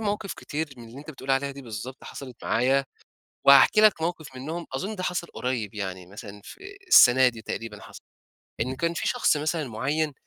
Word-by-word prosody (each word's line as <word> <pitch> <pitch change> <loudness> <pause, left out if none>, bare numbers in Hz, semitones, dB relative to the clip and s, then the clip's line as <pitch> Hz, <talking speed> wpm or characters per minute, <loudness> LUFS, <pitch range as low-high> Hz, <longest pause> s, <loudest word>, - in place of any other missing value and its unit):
مواقف 205 -2 -2
كتير 155 +1 -4
من 115 -1 -12
اللي 125 +4 -11
أنت 150 +2 -9
بتقول 135 -2 -7
عليها 135 +1 +1
دي 140 0 -10
بالضبط 120 +3 -8
حصلت 130 -3 -9
معايا، 135 +4 +2 0.6
وهاحكي 140 +9 +7
لك 215 -6 +5
موقف 160 -5 -4
منهم. 160 +6 -5
أظن 190 +11 -3
ده 185 - -5
حصل 180 -1 -2
قريب 125 - -4
يعني 95 -3 -5
مثلًا 105 +1 -10
في 395 +1 -11
السنة 130 - +7
دي 115 -2 -8
تقريبًا 105 -1 -6
حصل. - - -12 0.6
إن 130 +3 -2
كان 170 +5 -1
في - - -2
شخص 245 -10 +2
مثلًا 155 0 -2
معيّن، 140 +7 -1
135 Hz, 185 wpm, -26 LUFS, 120-160 Hz, 0.6 s, وهاحكي